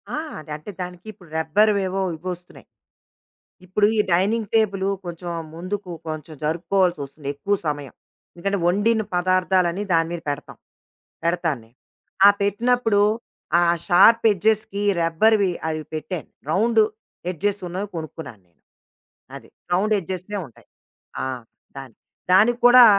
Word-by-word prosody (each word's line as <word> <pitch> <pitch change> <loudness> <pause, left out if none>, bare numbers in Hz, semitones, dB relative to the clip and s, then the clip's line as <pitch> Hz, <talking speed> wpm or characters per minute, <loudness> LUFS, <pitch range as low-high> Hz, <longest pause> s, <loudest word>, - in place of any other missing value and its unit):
ఆ! - - -3 0.2
అది 155 0 -11
అంటే 155 +7 -8
దానికి 180 +1 -7
ఇప్పుడు 180 -4 -18
రబ్బర్ 205 +7 +3 0.2
ఏవో 195 +1 -2 0.2
ఇవొస్తున్నాయి. 180 +1 -8 1.0
ఇప్పుడు 205 +3 +2
ఈ - - 0
డైనింగ్ 205 +4 +1
టేబులు 195 -3 +2 0.2
కొంచెం 175 0 -6 0.2
ముందుకు 185 +3 -5 0.2
కొంచెం 155 0 -6
జరుపుకోవాల్సొస్తుంది 160 -4 -1
ఎక్కువ 200 +8 0
సమయం. 145 -2 -3 0.4
ఎందుకంటే 195 +3 -1
వండిన 210 +5 +2
పదార్థాలనీ 185 0 +2
దాని 165 0 +3
మీద 170 - -4
పెడతాం. 145 0 -6 0.7
పెడతాను 170 -6 0
నేను. 115 +2 -26 0.5
ఆ - - +11
పెట్టినప్పుడు 225 +1 +2 0.6
ఆ - - +2 0.2
షార్ప్ 200 +6 +6
ఎడ్జెస్‌కి 205 0 0 0.2
రబ్బర్‌వి 195 +4 +3 0.2
అవి 155 -1 -2
పెట్టాను 155 +1 -5 0.2
రౌండ్ 225 +6 +3 0.5
ఎడ్జెస్ 200 +4 -1
ఉన్నవి 190 +4 -4
కొనుక్కున్నాను 155 - -8
నేను. 85 - -40 0.7
అది. - - -12 0.2
రౌండ్ 210 +4 +2
ఎడ్జెస్‌నే 185 +3 -5
ఉంటాయి. 120 - -21 0.6
ఆ! - - -3 0.5
దానికి. 135 -4 -11 0.3
దానికి 220 +6 +5
కూడా 245 0 +9
185 Hz, 125 wpm, -23 LUFS, 165-205 Hz, 1.0 s, ఆ